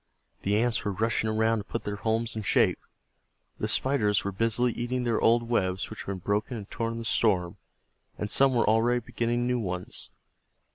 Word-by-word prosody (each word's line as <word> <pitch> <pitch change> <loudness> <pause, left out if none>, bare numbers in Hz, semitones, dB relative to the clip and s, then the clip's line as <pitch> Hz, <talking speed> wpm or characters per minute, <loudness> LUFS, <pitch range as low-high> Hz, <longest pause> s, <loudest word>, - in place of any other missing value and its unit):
The 100 +1 +1
Ants 120 +1 +1
were 100 - -1
rushing 110 +1 0
around 110 +1 +2
to - - -5
put - - -5
their 105 0 -4
homes 110 +1 -1
in 110 - -3
shape, 100 - +2 0.8
the - - -1
Spiders 105 -7 +1
were 100 - -2
busily 115 +4 +1
eating 125 +1 -2
their 115 -2 0
old 120 +1 +4
webs, 95 -5 -1
which 110 - -8
had - - -23
been 100 -1 -3
broken 105 +6 -1
and 100 -2 -8
torn 115 0 -2
in - - -5
the 115 - -5
storm, 95 -6 +1 0.6
and 105 - -2
some 135 +4 +4
were 115 - +2
already 115 +3 +3
beginning 120 +1 -1
new 125 0 +1
ones. 90 -4 -5
110 Hz, 195 wpm, -28 LUFS, 105-120 Hz, 0.8 s, old